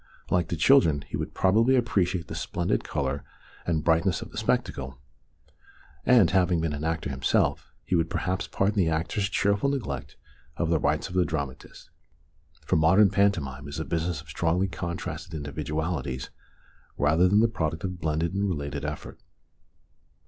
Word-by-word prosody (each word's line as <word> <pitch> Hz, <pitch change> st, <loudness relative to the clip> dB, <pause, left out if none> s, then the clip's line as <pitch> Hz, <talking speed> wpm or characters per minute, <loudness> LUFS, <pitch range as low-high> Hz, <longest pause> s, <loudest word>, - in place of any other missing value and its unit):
Like 90 Hz, -3 st, +2 dB
the 85 Hz, -, -2 dB
children, 80 Hz, -, +4 dB
he -, -, -3 dB
would -, -, -4 dB
probably 115 Hz, +7 st, +4 dB
appreciate 95 Hz, -8 st, +1 dB
the -, -, -7 dB
splendid 85 Hz, -9 st, -1 dB
colour 70 Hz, +1 st, -2 dB, 0.4 s
and 80 Hz, -3 st, 0 dB
brightness 85 Hz, +2 st, +2 dB
of -, -, -13 dB
the -, -, -10 dB
spectacle, 65 Hz, 0 st, -1 dB, 1.1 s
and, 120 Hz, -8 st, +6 dB
having 90 Hz, -2 st, +3 dB
been 80 Hz, -2 st, -1 dB
an 75 Hz, +1 st, -5 dB
actor 80 Hz, -2 st, -2 dB
him 65 Hz, 0 st, -6 dB
self, -, -, +1 dB
he -, -, -4 dB
would 85 Hz, -2 st, +2 dB
perhaps 90 Hz, +1 st, -2 dB
pardon 100 Hz, +2 st, 0 dB
the 90 Hz, -5 st, +3 dB
actors' 80 Hz, +6 st, -1 dB
cheerful 100 Hz, +5 st, +1 dB
neglect 105 Hz, -, -4 dB, 0.4 s
of 85 Hz, -1 st, 0 dB
the 80 Hz, -, +3 dB
rights 75 Hz, +1 st, 0 dB
of -, -, -10 dB
the 90 Hz, -1 st, +3 dB
dramatist. 70 Hz, -6 st, -6 dB, 0.7 s
For -, -, +2 dB
modern 95 Hz, +5 st, +5 dB
pantomime 80 Hz, -10 st, 0 dB
is 70 Hz, +2 st, -5 dB
a 80 Hz, -, -3 dB
business 85 Hz, -2 st, -2 dB
of -, -, -18 dB
strongly 90 Hz, +3 st, +1 dB
contrasted 85 Hz, -2 st, -5 dB
individualities 75 Hz, -2 st, -3 dB, 0.7 s
rather 80 Hz, +5 st, +4 dB
than 100 Hz, +3 st, +4 dB
the 115 Hz, -, +5 dB
product 80 Hz, -8 st, -3 dB
of 90 Hz, -1 st, -4 dB
blended 80 Hz, +2 st, 0 dB
and 100 Hz, +1 st, 0 dB
related 70 Hz, -4 st, -3 dB
effort. 75 Hz, 0 st, -6 dB
85 Hz, 165 wpm, -27 LUFS, 75-95 Hz, 1.1 s, and